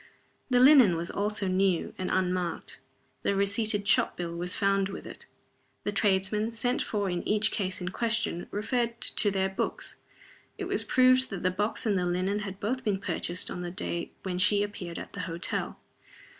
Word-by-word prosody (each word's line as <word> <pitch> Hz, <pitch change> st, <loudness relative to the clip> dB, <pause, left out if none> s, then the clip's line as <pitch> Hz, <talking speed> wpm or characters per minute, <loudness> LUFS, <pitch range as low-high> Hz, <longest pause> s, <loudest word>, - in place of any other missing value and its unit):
The 250 Hz, -1 st, +4 dB
linen 255 Hz, -, +7 dB
was 170 Hz, +1 st, -3 dB
also 205 Hz, -1 st, -1 dB
new, 185 Hz, -1 st, +1 dB
and 185 Hz, -, -3 dB
unmarked. 180 Hz, -5 st, -1 dB, 0.4 s
The 200 Hz, -, 0 dB
receipted 200 Hz, +1 st, +1 dB
shop -, -, +3 dB
bill 170 Hz, -1 st, -4 dB
was 175 Hz, +1 st, -1 dB
found 195 Hz, -1 st, +2 dB
with 195 Hz, -, -7 dB
it. -, -, -10 dB, 0.6 s
The 205 Hz, -, -1 dB
tradesmen, 205 Hz, +2 st, +1 dB
sent 245 Hz, +2 st, 0 dB
for 205 Hz, -2 st, -1 dB
in 175 Hz, -1 st, -1 dB
each 215 Hz, +1 st, +2 dB
case 190 Hz, -2 st, -2 dB
and 180 Hz, +1 st, -4 dB
questioned, 225 Hz, -6 st, -1 dB
referred 235 Hz, +2 st, -1 dB
to 205 Hz, -, +2 dB
their 190 Hz, -1 st, 0 dB
books. 190 Hz, -, -3 dB, 0.6 s
It -, -, -4 dB
was -, -, 0 dB
proved 255 Hz, 0 st, +4 dB
that 195 Hz, -3 st, -5 dB
the 185 Hz, -, +2 dB
box 210 Hz, +6 st, -1 dB
and 205 Hz, -4 st, +2 dB
the 180 Hz, -, 0 dB
linen 185 Hz, +3 st, 0 dB
had 195 Hz, -2 st, -6 dB
both 250 Hz, +6 st, -2 dB
been 205 Hz, -3 st, +1 dB
purchased 180 Hz, -1 st, -1 dB
on 180 Hz, -, -5 dB
the 175 Hz, -, -4 dB
day 170 Hz, -1 st, -3 dB
when 180 Hz, -2 st, -3 dB
she 205 Hz, +1 st, +4 dB
appeared 185 Hz, -5 st, -6 dB
at -, -, -8 dB
the -, -, -7 dB
hotel. 170 Hz, +2 st, -2 dB
200 Hz, 185 wpm, -28 LUFS, 185-215 Hz, 0.6 s, linen